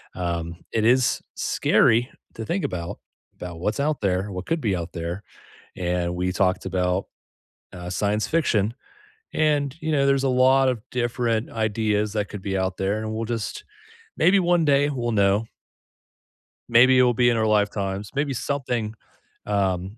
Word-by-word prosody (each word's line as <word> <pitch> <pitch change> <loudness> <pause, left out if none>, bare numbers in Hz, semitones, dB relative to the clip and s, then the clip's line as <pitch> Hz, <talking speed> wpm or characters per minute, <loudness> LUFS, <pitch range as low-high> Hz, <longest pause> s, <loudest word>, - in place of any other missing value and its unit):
Um, 85 -1 -3
it 110 -1 0
is 125 +1 +3
scary 120 +3 +2 0.2
to 110 - -6
think 180 - -2
about 85 -1 -4 0.4
about 85 -2 -8
what's 105 +9 -2
out 150 +1 0
there, 95 0 0
what 90 0 -5
could 165 - 0
be 100 -4 0
out 85 0 -5
there, 85 +4 -5 0.5
and 90 -1 -1
we 90 +1 -1
talked 95 -1 0
about, 90 0 0 0.7
uh, 90 0 -8
science 105 +3 0
fiction, 115 -9 +1 0.6
and, 145 -3 +1
you 160 - -2
know, 140 -2 +3
there's 135 -1 +3
a - - +2
lot 130 +1 +4
of 125 -4 -1
different 120 -2 -1
ideas 105 -1 0
that 105 -2 -2
could 105 - -7
be 95 0 -2
out 95 0 -1
there, 100 +3 -1
and 110 0 -4
we'll 115 +1 -3
just 115 -2 -4 0.5
maybe 190 +4 +5
one 175 -2 +2
day 145 0 +3
we'll 120 -4 -2
know. 100 +1 +2 1.2
Maybe 125 +3 +6
it 125 - +6
will 125 -1 +3
be 120 +1 +3
in 120 - +1
our 110 - +1
lifetimes. 100 -2 0
Maybe 140 0 0
something, 125 -5 -2 0.5
um 95 0 -1
110 Hz, 165 wpm, -24 LUFS, 95-130 Hz, 1.2 s, Maybe